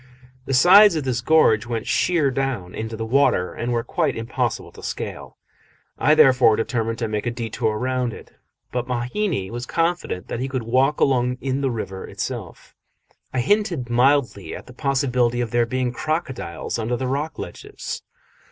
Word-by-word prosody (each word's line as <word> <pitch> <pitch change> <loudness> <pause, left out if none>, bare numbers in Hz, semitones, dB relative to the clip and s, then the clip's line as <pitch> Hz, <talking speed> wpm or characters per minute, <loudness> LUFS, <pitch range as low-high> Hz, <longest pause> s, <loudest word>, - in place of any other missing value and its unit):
The 135 - 0
sides 185 +7 +8
of 155 - -1
this 125 -2 -1
gorge 120 -7 +4
went 115 -2 -3
sheer 160 -6 +2
down 125 -9 -2
into 110 0 -5
the 115 - -3
water, 110 -7 +2
and 120 +1 -3
were 120 -1 0
quite - - -1
impossible 115 +1 -2
to - - -13
scale. - - -6 0.6
I 150 - +4
therefore 125 -6 +6
determined 115 0 -1
to 115 - -2
make 105 +1 -3
a - - +3
detour 115 -2 -2
round 125 0 -1
it, - - -12 0.4
but 125 0 -2
Mahina 125 - -2
was 120 +1 -5
confident 165 - -1
that - - -4
he 130 - -2
could 130 -3 -2
walk 130 +5 +2
along 125 -2 +2
in 135 +1 -2
the 135 - +1
river 95 -5 -5
itself. - - -6 0.6
I 130 - 0
hinted 170 - 0
mildly 125 - +2
at - - -9
the 125 - -13
possibility 125 -3 +1
of 120 -2 -2
there 120 -1 +2
being 125 0 -1
crocodiles 130 - -3
under 115 +2 -1
the 130 - -3
rocky 140 +5 -2
ledges. 420 +1 -7
125 Hz, 170 wpm, -22 LUFS, 115-135 Hz, 0.6 s, sides